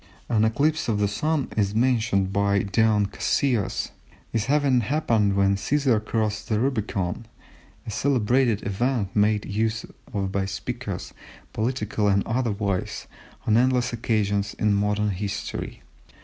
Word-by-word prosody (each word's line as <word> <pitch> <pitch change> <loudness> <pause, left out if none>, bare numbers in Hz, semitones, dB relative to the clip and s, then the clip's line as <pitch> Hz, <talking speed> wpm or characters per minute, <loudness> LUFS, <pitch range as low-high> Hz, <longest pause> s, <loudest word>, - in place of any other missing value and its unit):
An 110 -2 +3
eclipse 145 +8 +1
of 110 - +1
the 105 0 +2
Sun 145 +8 -1
is 100 -1 0
mentioned 110 -5 +2
by 100 0 +2
Dion 105 +1 +2
Cassius 110 +2 0 0.4
as 115 -1 0
having 140 -2 +3
happened 115 -6 +1
when 100 0 +3
Cæsar 125 0 +1
crossed 110 0 -2
the 105 -2 +1
Rubicon, 110 -5 -1 0.6
a - - -5
celebrated 120 -1 +1
event 105 0 -1
made 105 0 +2
use 110 +2 -1 0.3
of 100 -4 -2
by 95 0 0
speakers, 95 -1 -5 0.4
political 110 -2 -1
and 100 -1 +2
otherwise, 105 -5 -1 0.4
on 110 0 +4
endless 125 0 +2
occasions 105 -3 0
in 105 -1 +1
modern 105 +1 +1
history. 100 +2 -5
110 Hz, 130 wpm, -25 LUFS, 100-120 Hz, 0.6 s, on